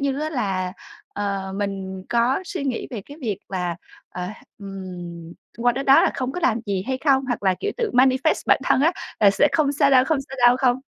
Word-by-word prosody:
như 275 0 -1
á 310 +1 -2
là, 190 -9 -2 0.4
ờ, 195 -2 -3
mình 190 -2 -4
có 240 +5 +2
suy 370 -6 -5
nghĩ 260 -4 -2
về 235 -5 -5
cái 285 - -11
việc 215 -7 -2
là, 180 -3 -2 0.3
ờ, 180 - -6 0.4
ừm, 180 -4 -8 0.3
qua 245 +1 +3
tới 270 +2 -3
đó 270 0 +7
là - - +3
không 260 -1 -3
có 360 - -4
làm 235 -8 +1
gì 195 -2 -1
hay 260 0 -1
không? 270 -2 +2
Hoặc 245 -4 -2
là, 190 -2 +3
kiểu, 415 - -1
tự 465 -3 -1
manifest 260 +4 +3
bản - - +4
thân - - +3
á 320 +5 +4 0.3
là 205 -2 +7
"Sẽ 245 +9 +3
không 295 -3 +2
sao 280 -1 +3
đâu, 255 -2 +6
không 315 +1 +1
sao 270 - -8
đâu" 245 - +4
Không? 255 -1 +2
245 Hz, 225 wpm, -23 LUFS, 195-275 Hz, 0.4 s, đó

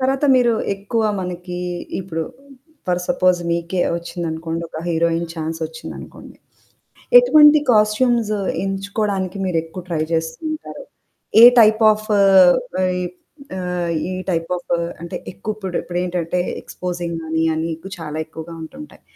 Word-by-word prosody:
తర్వాత 270 +2 +1
మీరు, 240 -2 +3 0.2
ఎక్కువ 205 +3 -2 0.2
మనకి 180 0 -5 0.4
ఇప్పుడు 165 -3 -4 0.6
ఫర్ 180 0 0
సపోజ్ 185 -9 +3
మీకే 170 +2 -1 0.2
వచ్చిందనుకోండి 165 -1 -4
ఒక 160 - -7
హీరోయిన్ 170 0 +1
చాన్స్ 160 0 -4
వచ్చిందనుకోండి. 160 0 -10 0.8
ఎటువంటి 305 -11 +7
కాస్ట్యూమ్స్ 215 +1 +2 0.3
ఎంచుకోవడానికి 195 -1 -2
మీరు 180 -3 0
ఎక్కువ 165 +3 -9
ట్రై 165 -3 -1
చేస్తూ 160 0 -1
ఉంటారు. 310 - -8 0.6
ఏ - - +12 0.2
టైప్ 220 0 +5
ఆఫ్ 215 0 -6
ఆహ్, 190 -2 +7 1.0
ఆహ్, 180 -2 -2 0.2
ఈ - - -3 0.2
టైప్ 165 -1 -2
ఆఫ్ 175 - -6 0.3
అంటే 170 - -6 0.2
ఎక్కువ 210 +3 -5
ఇప్పుడు 190 -4 -5
ఇప్పుడేటంటే 175 -1 -2 0.2
ఎక్స్‌పోజింగ్ 175 -2 -5
గాని 160 0 0 0.3
చాలా 155 -2 -5
ఎక్కువగా 160 +1 -9
ఉంటుంటాయి. 275 - -11
180 Hz, 120 wpm, -20 LUFS, 165-210 Hz, 1.0 s, ఏ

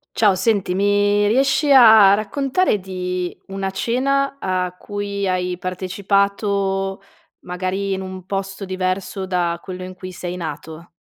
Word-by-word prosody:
Ciao. 210 -3 +4
Senti, 195 -1 +1
mi 205 +1 +2
riesci 270 +5 +2
a 220 -6 +8
a - - +6
raccontare 270 - 0
di 180 -1 -4
una 195 0 -3
cena 275 +7 0
a 185 -1 -1
cui 200 0 -4
hai 180 -1 -1
partecipato, 195 +1 -1 0.4
magari 185 +2 -3
in 190 - -3
un 185 -1 -8
posto 195 +1 -4
diverso 185 +1 -3
da 175 -2 -1
quello 185 -1 -7
in 185 0 -7
cui 185 0 -9
sei 180 0 -6
nato? 165 -1 -7
195 Hz, 135 wpm, -20 LUFS, 185-205 Hz, 0.4 s, a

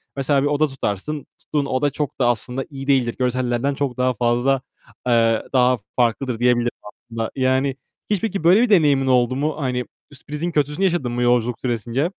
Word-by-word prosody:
Mesela 140 0 +1
bir - - +2
oda 150 +1 +2
tutarsın. 135 +2 -4
Tuttuğun 145 -2 -2
oda 140 +2 0
çok 145 0 -4
da 125 - +3
aslında 125 +3 -1
iyi 135 -2 -8
değildir. 130 -4 +2
Görsellerden 125 +1 0
çok 135 -3 -3
daha 125 0 +1
fazla, 120 +3 +1 0.5
eee, 115 -2 +3
daha 125 -1 +4 0.2
farklıdır 120 0 0
diyebilirim 120 -1 +2
aslında. 115 +1 -6
Yani 130 +1 +1 0.3
hiç 205 -4 0
peki 200 -6 -2
böyle 185 +7 +6
bir 245 - +2
deneyimin 145 -9 +4
oldu 125 -1 +3
mu? 150 +3 -1
Hani 125 -2 -1 0.3
sürprizin 150 +5 -5
kötüsünü 150 +5 0
yaşadın 170 -10 0
mı 120 0 -2
yolculuk 120 -1 +2
süresince? 120 +3 -1
130 Hz, 170 wpm, -21 LUFS, 120-145 Hz, 0.5 s, böyle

